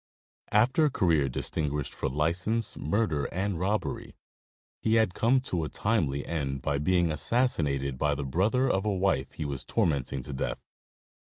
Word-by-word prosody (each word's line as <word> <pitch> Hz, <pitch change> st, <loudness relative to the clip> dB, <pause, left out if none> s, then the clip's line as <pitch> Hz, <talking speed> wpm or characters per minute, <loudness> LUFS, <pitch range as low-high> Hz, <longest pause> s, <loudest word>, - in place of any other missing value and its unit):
After 125 Hz, +9 st, +4 dB
a -, -, +3 dB
career 80 Hz, -, +2 dB
distinguished 75 Hz, +2 st, -2 dB
for -, -, -2 dB
license, 85 Hz, -, 0 dB
murder 80 Hz, -4 st, 0 dB
and 95 Hz, -1 st, -2 dB
robbery, 100 Hz, +4 st, -2 dB, 0.6 s
he 110 Hz, 0 st, +1 dB
had 110 Hz, -5 st, +3 dB
come 120 Hz, +7 st, +3 dB
to 90 Hz, -10 st, -2 dB
a 75 Hz, -, -3 dB
timely 75 Hz, -11 st, 0 dB
end 70 Hz, -5 st, -3 dB
by 70 Hz, -1 st, 0 dB
being 85 Hz, +1 st, +2 dB
assassinated 75 Hz, -, +1 dB
by 75 Hz, 0 st, +1 dB
the 70 Hz, -, -4 dB
brother 105 Hz, -, +1 dB
of 95 Hz, -6 st, +1 dB
a 105 Hz, -, 0 dB
wife 95 Hz, -8 st, 0 dB
he 75 Hz, -, -5 dB
was 70 Hz, -3 st, -3 dB
tormenting 70 Hz, -4 st, -1 dB
to 70 Hz, -, -6 dB
death. 65 Hz, -, -2 dB
85 Hz, 160 wpm, -28 LUFS, 70-105 Hz, 0.6 s, After